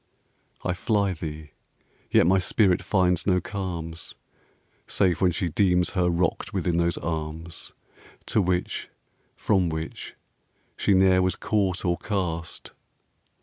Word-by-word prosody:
I 90 - 0
fly 100 0 +1
thee, 75 -2 -7 0.6
yet - - +5
my 95 +2 +4
spirit 95 0 +2
finds 90 -3 +1
no 90 -2 +4
calms 85 -4 -5 0.7
Save 90 -2 +1
when 95 - +5
she 90 +1 -1
deems 90 0 +2
her 90 -3 +1
rocked 85 0 -1
within 85 -1 0
those 85 0 +1
arms 80 0 -5 0.5
To 110 - +2
which, 90 -1 -1 0.5
from 95 -5 +1
which 80 0 -6 0.6
she 100 - +2
ne'er 95 0 +5
was 95 0 +1
caught 95 -3 0
or 85 -1 +1
cast. 85 -5 -3
90 Hz, 125 wpm, -25 LUFS, 85-95 Hz, 0.7 s, yet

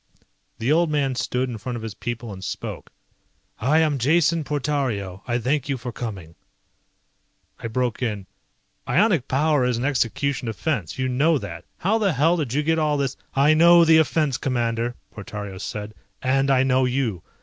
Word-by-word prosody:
The 115 +5 0
old 165 +1 +3
man 140 -3 0
stood 125 +1 -1
in 120 -3 -6
front 120 +4 -5
of 115 - -6
his 110 -2 -5
people 120 0 -5
and 95 -1 -9
spoke. - - -6 0.7
"I 140 +7 +2
am 150 -4 +1
Jason 160 +4 +3
Portario, 130 -10 -2
I 120 -1 +1
thank 135 +4 -1
you 135 - 0
for 120 0 -6
coming." 100 -9 -6 1.3
I - - -4
broke 120 0 -2
in, 105 -6 -2 0.6
"Ionic 185 - +2
power 145 0 +2
is 125 -2 +1
an 120 - -2
execution 135 -1 0
offense. 115 - -2
You 130 0 0
know 145 +6 +2
that. 90 -8 -7
How 215 +5 +1
the 200 -5 +2
hell 155 +6 +3
did 150 -8 -2
you 150 +4 0
get 160 +1 +1
all 150 -1 +1
this 135 -2 -1 0.2
..." - - -31
"I 140 +3 +5
know 170 +2 +7
the 160 0 +6
offense, 155 -3 +1
Commander," 120 -2 -1 0.2
Portario 100 -2 -7
said, 105 +1 -5 0.3
"and 135 +1 +1
I 130 -1 +4
know 130 0 +3
you. 125 -8 -1
130 Hz, 180 wpm, -23 LUFS, 115-150 Hz, 1.3 s, know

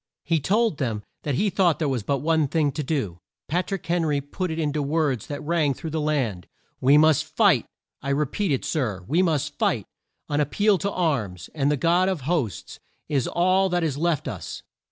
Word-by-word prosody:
He 165 +1 +1
told 210 +4 +1
them 115 -6 -2 0.2
that 145 -3 -1
he 205 +8 +1
thought 180 -5 +3
there 155 - 0
was 130 -4 0
but 140 +5 -1
one 160 -2 +2
thing 150 0 +1
to 150 - -3
do. 130 - -2 0.3
Pat 175 +4 -1
rick 195 -1 -4
Hen 170 0 +1
ry 150 -3 +1
put 175 +6 -4
it 160 - -3
in 150 -3 0
to 150 - 0
words 145 -5 0
that 145 0 -5
rang 155 -3 +1
through 160 - -6
the 160 0 -1
land: 130 - -1 0.3
"We 140 +3 +5
must 155 -1 +5
fight! - - +3 0.3
I 140 - -4
repeat 150 +7 0
it, 135 - 0
Sir, 110 - -1
we 165 +7 +3
must 160 -6 0
fight! - - +1 0.4
An 145 0 +1
ap 145 - 0
peal 205 0 +3
to 200 +3 -1
arms, 115 - -2
and 145 -2 +1
the 150 - +1
God 175 +6 +3
of 185 -6 -2
hosts, 135 - -2 0.3
is 140 -5 +1
all 185 +2 +2
that 175 -1 0
is 155 -4 0
left 155 -1 0
us!" 95 - -6
150 Hz, 215 wpm, -24 LUFS, 140-170 Hz, 0.4 s, We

